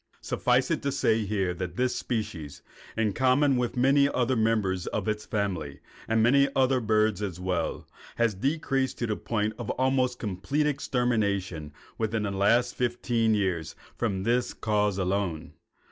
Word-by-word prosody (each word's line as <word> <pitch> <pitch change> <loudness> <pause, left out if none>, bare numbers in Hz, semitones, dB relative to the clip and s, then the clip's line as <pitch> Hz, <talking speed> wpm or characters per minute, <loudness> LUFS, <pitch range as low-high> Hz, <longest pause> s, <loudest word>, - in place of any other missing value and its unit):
Suffice - - +1
it - - 0
to 140 - -1
say 110 -4 +1
here 95 -3 0
that 90 0 -5
this 125 0 0
species, 85 - -4 0.3
in 110 -3 +1
common 130 +3 +3
with 125 0 -1
many 140 +3 +4
other 130 -1 +1
members 110 -5 +1
of 105 -1 -3
its 105 0 -2
family, 90 -9 -2 0.3
and 115 0 +2
many 140 +4 +4
other 130 -1 +3
birds 110 -2 +1
as 95 -4 -4
well, 90 -3 -2 0.3
has 115 -2 +2
decreased 135 - -1
to 120 - -1
the 110 -2 -1
point 105 -1 -2
of 120 - -5
almost 130 -1 +1
complete 105 +9 -1
extermination 105 - -1 0.3
within 110 -1 -1
the 100 - -2
last 115 +5 +2
fifteen 120 -2 +1
years 90 -6 -1 0.2
from 100 -5 -1
this 120 +3 0
cause 105 -2 0
alone. 95 -4 -2
110 Hz, 155 wpm, -27 LUFS, 95-125 Hz, 0.3 s, many